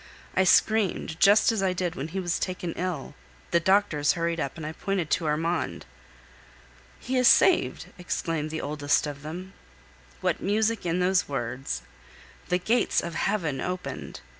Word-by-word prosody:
I 190 - +4
screamed, 190 -6 +2
just 205 +3 +6
as 220 -3 -1
I 190 -1 +1
did 180 -2 -2
when 140 - -5
he 185 +4 -4
was 175 -2 -1
taken 180 -2 -3
ill; 175 -7 -4 0.4
the 170 - +4
doctors 170 -5 +3
hurried 170 0 -1
up, 140 0 -3
and 160 - -6
I 155 - -3
pointed 180 -1 -2
to 165 - +1
Armand. 165 +3 -1 1.1
"He 260 +1 -2
is 250 -1 +5
saved!" 370 - +4
exclaimed 165 -3 -2
the 160 0 -4
oldest 145 0 0
of 145 -1 -6
them. 180 +6 -7 0.7
What - - -1
music 215 0 0
in 175 +2 0
those 185 -2 +2
words! 120 - -3 0.7
The 180 - +3
gates 225 +7 +1
of 170 - -5
heaven 165 -7 -1
opened! 180 0 -5
175 Hz, 160 wpm, -26 LUFS, 155-190 Hz, 1.1 s, just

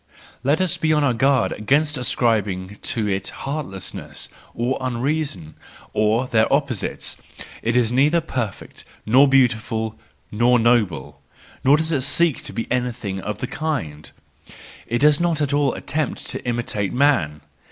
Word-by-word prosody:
Let 140 +4 +2
us 185 -4 +1
be 155 - +1
on 150 -1 +2
our 135 -3 +3
guard 130 +1 +2
against 145 +7 +1
ascribing 105 -6 0
to 110 -4 -1
it 95 -1 -1 0.2
heartlessness 135 - -5 0.3
and 120 +3 +1
unreason, 130 - -2 0.4
or 110 +4 +2
their 110 -3 +2
opposites; 140 -6 -1 0.4
it 115 +1 0
is 120 -2 +3
neither 145 +7 +4
perfect, 125 - -5 0.2
nor 135 +6 +6
beauti¬ 135 -3 +5
ful, 110 0 -4 0.3
nor 120 +3 +4
noble; 115 -7 +1 0.4
nor 140 +3 +6
does 160 +1 -1
it 145 -5 +1
seek 150 +2 +2
to - - -5
be 115 - -3
anything 120 -6 -2
of 105 +1 -4
the 125 - -3
kind, 120 - -4 0.8
it 120 - 0
does 150 +3 +4
not 170 -2 +1
at 145 -1 0
all 145 -1 +2
attempt 155 0 -3
to - - -6
imitate 115 -5 -1
man! 105 - +2
125 Hz, 150 wpm, -22 LUFS, 110-145 Hz, 0.8 s, nor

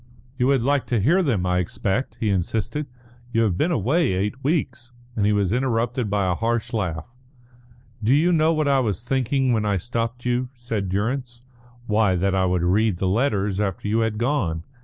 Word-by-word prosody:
"You 125 0 +1
would 135 -3 +2
like 140 +1 +1
to 120 - +1
hear 170 - +3
them, 115 - 0
I 90 0 +1
expect," 95 +7 -2
he 110 -3 0
insisted. 110 - -2 0.4
"You 115 -1 +2
have 100 -6 +1
been 155 - +1
away 145 - +1
eight 105 +8 -2
weeks." 130 -5 -1 0.2
And 105 -2 +1
he - - +3
was 100 -2 +1
interrupted 120 -2 0
by 100 -1 +1
a 90 - +1
harsh 115 +4 -1
laugh. 90 -1 -3 0.9
"Do 120 +6 +4
you 165 +5 +3
know 160 -1 +3
what 155 -2 0
I 140 -1 +3
was 110 -4 -1
thinking 130 +1 0
when 110 -2 +1
I 100 -2 +1
stopped 120 +4 -3
you?" 125 +1 0
said 115 -6 -3
Durrance. 120 +5 -2 0.4
"Why, 105 -4 +2
that 95 +2 0
I 95 -1 +2
would 90 -1 0
read 100 +2 +2
the 95 - -1
letters 100 -2 0
after 105 -1 -2
you 110 +2 +1
had 110 -1 0
gone. 105 - -1
115 Hz, 195 wpm, -23 LUFS, 100-130 Hz, 0.9 s, Do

